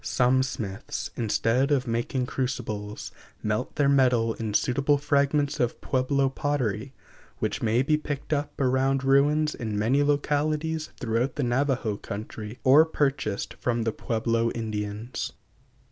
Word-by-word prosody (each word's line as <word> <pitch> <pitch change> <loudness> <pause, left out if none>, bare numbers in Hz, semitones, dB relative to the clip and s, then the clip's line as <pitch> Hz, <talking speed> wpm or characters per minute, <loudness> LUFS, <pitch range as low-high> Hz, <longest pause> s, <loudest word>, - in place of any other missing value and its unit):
Some 130 +1 +3
smiths, 110 -5 -4
instead 120 +3 +1
of 140 -4 +2
making 120 +2 -1
crucibles, 110 -6 -4 0.3
melt 110 +3 -2
their 145 -2 +3
metal 125 -5 +3
in 110 -2 -4
suitable 140 +5 +2
fragments 145 0 +1
of 120 -1 0
Pueblo 135 +1 +1
pottery, 135 -3 -2 0.4
which - - -2
may 115 +3 +2
be 150 +2 +2
picked 150 0 -4
up 145 0 -2
around 135 0 +2
ruins 145 +3 +3
in 110 -3 -4
many 120 +7 +2
localities 150 +2 0
throughout 120 +3 0
the 145 - -1
Navajo 125 -3 0
country 105 +2 -7
or 140 +4 +7
purchased 135 -9 -1
from 120 -2 0
the 115 - 0
Pueblo 115 +1 0
Indians. 110 +1 -4
130 Hz, 130 wpm, -26 LUFS, 115-140 Hz, 0.4 s, or